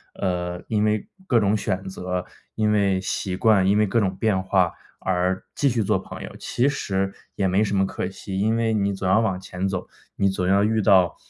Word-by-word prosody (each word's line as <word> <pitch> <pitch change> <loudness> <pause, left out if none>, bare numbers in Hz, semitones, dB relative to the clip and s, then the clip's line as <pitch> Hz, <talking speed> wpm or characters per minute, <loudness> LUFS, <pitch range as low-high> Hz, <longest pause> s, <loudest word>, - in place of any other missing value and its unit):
呃， 90 -2 -2
因 105 -2 +1
为 105 -1 0 0.2
各 120 - +4
种 100 0 +2
选 95 -2 -2
择、 90 -1 -4 0.3
因 105 -1 +1
为 100 -3 +2
习 95 0 -2
惯、 100 -2 +4
因 100 +2 +4
为 105 - +4
各 110 +4 +1
种 95 -3 0
变 100 -1 +1
化 95 -2 +2 0.3
而 95 0 0
继 145 - +1
续 115 -3 0
做 - - +1
朋 - - -9
友， - - -8
其 125 +3 0
实 95 -7 -2 0.2
也 100 - 0
没 95 +3 +2
什 100 -1 -1
么 95 - +3
可 90 - -3
惜。 95 0 -6
因 110 +3 +2
为 115 -1 +1
你 100 -1 +1
总 95 -1 -3
要 95 +3 +4
往 110 -5 0
前 90 0 -4
走， 95 -2 -4 0.3
你 100 - +2
总 95 -1 -1
要 100 +1 +4
遇 110 +1 +2
到， 95 -4 +4
95 Hz, 235 characters per minute, -24 LUFS, 95-105 Hz, 0.3 s, 各